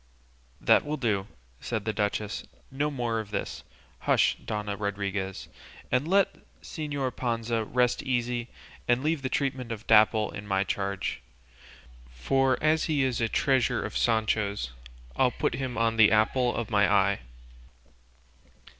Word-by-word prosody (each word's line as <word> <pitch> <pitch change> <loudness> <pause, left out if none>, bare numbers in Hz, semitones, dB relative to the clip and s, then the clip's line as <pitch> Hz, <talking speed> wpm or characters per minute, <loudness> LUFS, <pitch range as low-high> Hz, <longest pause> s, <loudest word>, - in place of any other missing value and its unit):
"That - - +4
will 150 +1 -3
do," 105 -7 0 0.3
said 110 -2 -3
the 110 - -1
duchess; 105 0 -2 0.3
"no 145 +3 0
more 120 -5 -1
of 110 -2 -6
this; 105 - -4 0.4
hush, - - +3
Dona 105 -1 -3
Rodriguez, 100 -2 -3 0.4
and 125 +4 +1
let 195 +2 +3 0.3
Señor 145 -5 -3
Panza 115 -2 -1
rest 125 +2 +1
easy 120 -1 -1 0.4
and 120 +2 +2
leave 155 -1 0
the 130 - -2
treatment 130 -3 -2
of 110 0 -6
Dapple 110 0 +4
in 105 0 -8
my 95 -1 +1
charge, 100 -1 -3 0.9
for 130 - +1
as 155 0 +3
he 150 -4 +1
is 130 -3 0
a 115 - +1
treasure 130 -2 +1
of - - -6
Sancho's, 105 - +1 0.4
I'll 130 -1 +4
put 120 - -1
him 130 0 -3
on 115 0 +1
the 110 -2 +7
apple 120 +3 +2
of 120 -1 -3
my 100 -2 +3
eye." 100 -1 +3
115 Hz, 145 wpm, -28 LUFS, 105-130 Hz, 0.9 s, the